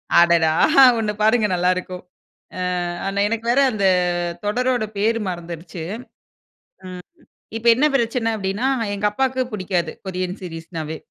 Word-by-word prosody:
அடடா! 170 -2 +5 0.5
ஒண்ணு 215 -2 -1
பாருங்க 220 0 +3
நல்லாருக்கும். 180 0 -1 0.5
அ - - -5 0.5
ஆனா, 195 +1 -2
எனக்கு 225 +1 -3
வேற 270 +3 +3
அந்த 200 -3 -1 0.6
தொடரோட 245 +3 0
பேரு 225 +3 +1
மறந்துருச்சு. 170 -1 -7
ம் - - -7 1.6
இப்ப 225 +1 -6
என்ன 275 +5 +2
பிரச்சன 235 -2 0
அப்டீன்னா, 200 +4 -2 0.3
எங்க 200 +1 -1
அப்பாக்கு 260 +3 0
புடிக்காது. 180 -5 -2
கொரியன் 185 0 -4
சீரிஸ்ன்னாவே. 165 -2 -6
200 Hz, 120 wpm, -21 LUFS, 175-230 Hz, 1.6 s, அடடா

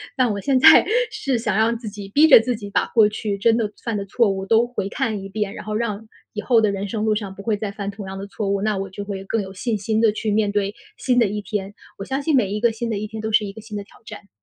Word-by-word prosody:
但 255 -4 +2
我 200 - -3
现 265 +6 +1
在， 315 +4 +8 0.3
是 275 - -1
想 215 -3 -1
让 230 +1 +2
自 225 -2 -7
己 205 -1 -9
逼 290 +9 +5
着 290 - +9
自 245 +2 -1
己 205 -2 -8
把 - - +1
过 215 -2 +4
去 210 -1 -3
真 225 +3 +3
的 220 -3 0
犯 230 -3 -2
的 200 - -4
错 230 +2 +2
误 195 0 -3
都 225 +3 +4
回 225 -5 -4
看 220 -3 -2
一 195 - -7
遍， 200 0 -3
然 - - -9
后 215 0 -3
让 220 -1 -3 0.3
以 210 - -3
后 230 -2 +3
的 210 -2 +2
人 200 +1 -3
生 215 +1 -3
路 220 -1 +2
上 200 -3 -5
不 200 - -10
会 210 -1 0
再 215 -1 -4
犯 200 -1 -5
同 200 -1 -9
样 190 - -6
的 195 - -6
错 200 0 -4
误， 200 0 0
那 215 -1 0
我 195 0 -4
就 195 +2 -7
会 195 -1 -6
更 225 +3 -1
有 190 -1 -8
信 215 +3 -2
心 215 +2 -1
地 225 -2 +3
去 215 0 -2
面 205 -1 +1
对 205 0 0 0.2
新 250 -2 +1
的 235 - +5
一 210 +1 -3
天。 205 -1 -4 0.2
我 195 - -6
相 270 +1 -2
信 310 +1 0
每 225 -8 +3
一 210 +1 -3
个 235 -1 +3
新 230 +1 -4
的 215 - -1
一 215 +1 -4
天 220 0 -7
都 220 - -3
是 215 -1 +4
一 195 - -5
个 220 - -12
新 215 -1 -9
的 200 - -5
挑 - - -21
战。 200 - -11
210 Hz, 335 characters per minute, -22 LUFS, 200-230 Hz, 0.3 s, 着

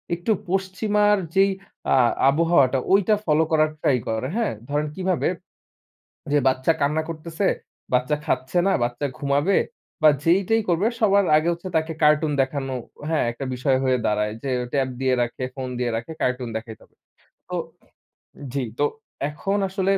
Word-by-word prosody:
একটু 175 +6 -2 0.2
পশ্চিমার 205 +2 +2 0.2
যেই 195 +1 +5 0.4
আ - - +5 0.3
আবহাওয়াটা, 140 -4 +3
ঐটা 205 +2 +4
ফলো 155 0 +3
করার 155 -1 +4
ট্রাই 130 - +3
করে। 110 +3 -1
হ্যাঁ? 230 -3 0 0.2
ধরেন 150 +1 0
কীভাবে? 185 -2 0 1.0
যে 145 - +4
বাচ্চা 130 +4 +2
কান্না 150 +3 +2
করতেসে, 165 +4 -2 0.4
বাচ্চা 125 +4 +2
খাচ্ছে 130 +6 -1
না, - - +3
বাচ্চা 120 +4 -2
ঘুমাবে 145 +7 +1 0.4
বা 155 - +8
যেইটাই 195 +6 +3
করবে, 175 +5 +2
সবার 200 -3 +4
আগে 155 +2 0
হচ্ছে 170 +2 -7
তাকে 160 +1 -1
কার্টুন 150 0 +4
দেখানো 135 0 -2 0.4
হ্যাঁ, 160 - +2
একটা 120 +3 -6
বিষয় 130 +1 +1
হয়ে 130 -1 +2
দাঁড়ায় 105 0 0
যে 135 - -2 0.2
ট্যাব 135 -2 +1
দিয়ে 130 -1 +2
রাখে, 120 +2 -3
ফোন 130 -2 -4
দিয়ে 120 -1 0
রাখে, 115 +7 -5
কার্টুন 125 -1 -1
দেখাইতে 110 0 -9
হবে। - - -25 0.5
তো - - -3 1.0
জি, 140 -2 -1 0.2
তো 145 - +4 0.4
এখন 195 +7 -2
আসলে 190 0 0
150 Hz, 155 wpm, -23 LUFS, 130-185 Hz, 1.0 s, বা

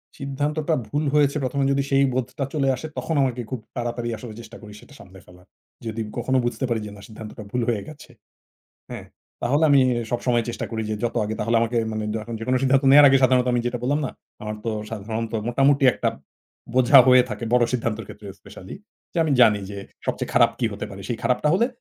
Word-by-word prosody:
সিদ্ধান্তটা 145 +3 -2
ভুল 145 +1 -2
হয়েছে 145 -1 +3
১ম 130 +2 -2
এ - - +2
যদি 140 0 +1
সেই 135 0 +3
বোধটা 130 +3 -2
চলে 140 -3 0
আসে 145 +5 -7
তখন 160 - -2
আমাকে 125 -2 -1
খুব 130 -3 -4 0.2
তাড়াতাড়ি 120 0 -3
আসলে 110 0 -9
চেষ্টা 115 +1 -12
করি 105 -2 -11
সেটা - - -17
সামলে 95 0 -14
ফেলার। 90 0 -19 0.4
যদি 115 0 -4 0.2
কখনো 130 +2 0
বুঝতে 120 +2 -2
পারি 115 -2 0
যে, 105 - -8
না 100 - -13
সিদ্ধান্তটা 110 0 -10
ভুল 125 - -1
হয়ে 110 -4 0
গেছে। 155 -1 -12 0.8
হ্যাঁ, - - -7 0.4
তাহলে 145 +6 +2
আমি 140 -1 +6 0.3
সবসময় 120 -1 0
চেষ্টা 120 - -4
করি 110 -1 -3
যে, 110 - 0
যত 120 - -2
আগে 110 +1 -3
তাহলে 115 +2 +1
আমাকে 115 +1 0
মানে 110 0 -3
দ - - 0 0.2
যেকোন 125 +3 -1
সিদ্ধান্ত 135 +1 +3
নেওয়ার 145 +1 +9
আগে 135 - +5
সাধারণত 130 -1 +4
আমি 120 - +2
যেটা 120 0 -2
বললাম 145 +4 0
না - - -5 0.3
আমার 105 0 -4
তো 115 - -1 0.2
সাধারণত 110 +1 -4 0.2
মোটামুটি 135 +3 +3
একটা - - -1 0.7
বোঝা 130 +2 +7
হয়ে 130 -1 +7
থাকে - - -5
বড় 125 -1 +4
সিদ্ধান্তের 115 -3 -2
ক্ষেত্রে 105 - -11
স্পেশালী। - - -11 0.4
যে, - - -3
আমি 155 - 0
জানি 110 -4 +5
যে, 100 - -7 0.3
সবচেয়ে - - -2
খারাপ - - +5
কি 115 - +1
হতে 100 - -5
পারে। 100 0 -9
সেই 120 - -3
খারাপটা 125 +4 +1
হলে 230 +6 +3
125 Hz, 210 wpm, -23 LUFS, 115-135 Hz, 0.8 s, নেওয়ার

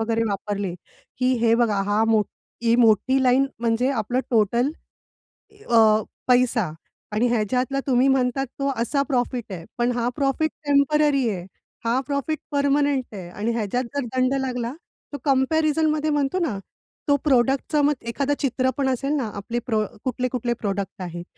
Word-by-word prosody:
वगैरे 225 0 0
वापरले 200 -2 -3 0.4
की 255 +1 +2
हे 230 -1 +4
बघा, 230 -4 +2
हा 205 +2 +1
मोठ 215 -2 +3 0.4
ही 235 0 +3
मोठी 245 +3 +4
लाईन 260 +2 +4
म्हणजे 235 +2 +1
आपलं 250 0 -1
टोटल 235 +4 +2 1.0
अ, 220 -2 +5 0.3
पैसा 245 -8 +3 0.4
आणि 220 +4 +2
ह्याच्यातला 250 +4 0
तुम्ही 255 0 +3
म्हणतात 265 0 +1
तो 275 0 +1
असा 280 +4 +1
प्रॉफिट 245 -4 -1
आहे. 170 -3 -7
पण 240 +1 +1
हा 240 -1 -1
प्रॉफिट 285 +2 0
टेम्पररी 285 -2 +3
आहे, 185 -4 -4 0.4
हा 240 +3 +2
प्रॉफिट 285 +2 -2
पर्मनेंट 285 -1 +2
आहे 180 -3 -7
आणि 210 +6 -2
ह्याच्यात 230 +2 -1
जर 280 - -1
दंड 255 +1 +2
लागला, 250 -1 -3 0.4
तो - - -3
कम्पॅरिझनमध्ये 305 +2 +2
म्हणतो 290 +4 0
ना, 275 - -1 0.5
तो 285 - +5
प्रॉडक्टचं 270 +2 +2
मग 295 - +3 0.2
एखादं 280 +4 0
चित्र 260 -2 +1
पण 270 -1 +1
असेल 275 +3 -1
ना, 255 -7 -1
आपले 230 +4 -3
प्रो 220 -3 +1 0.2
कुठले-कुठले 250 -1 -1
प्रॉडक्ट 200 -4 -4
आहेत, 175 -1 -6
250 Hz, 150 wpm, -23 LUFS, 225-275 Hz, 1.0 s, अ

